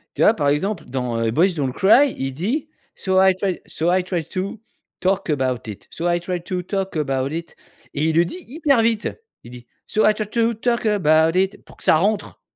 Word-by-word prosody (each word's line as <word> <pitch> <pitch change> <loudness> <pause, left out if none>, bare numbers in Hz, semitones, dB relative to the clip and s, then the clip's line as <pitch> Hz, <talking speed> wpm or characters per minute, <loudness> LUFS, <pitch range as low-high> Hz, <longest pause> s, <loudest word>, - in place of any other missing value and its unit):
Tu - - 0
vois 220 - +6
par 145 -6 0
exemple 180 +6 0
dans, 125 -2 -3
heu, 115 -1 +1
Boys 175 - +3
Don't 135 -4 -1
Cry, 245 - +4
il 135 0 -2
dit: 230 - -2 0.3
«So 190 -1 +1
I 190 0 +6
try, 190 -2 -1
so 170 +3 -1
I 185 0 +3
try 180 -3 -3
to 190 +7 -4 0.4
talk 190 -1 0
about 130 -4 0
it, 100 -1 -9
so 170 +1 -3
I 175 0 +2
try, 180 0 -3
to 180 +1 -3
talk 195 0 -3
about 135 -2 -1
it» 165 +1 -6 0.4
et 150 +2 0
il 160 - 0
le 170 - +5
dit 265 - -7
hyper 280 -3 +2
vite! 225 -1 +1 0.4
Il 120 - -11
dit: 120 -1 -11 0.2
«So 215 - +1
I 215 - +3
try 215 0 -3
to, 230 0 +1
talk 235 +1 -1
about 165 -5 +3
it» 190 +1 -1
pour - - -17
que - - -12
ça - - +5
rentre! 205 +5 -1
180 Hz, 225 wpm, -21 LUFS, 150-210 Hz, 0.4 s, vois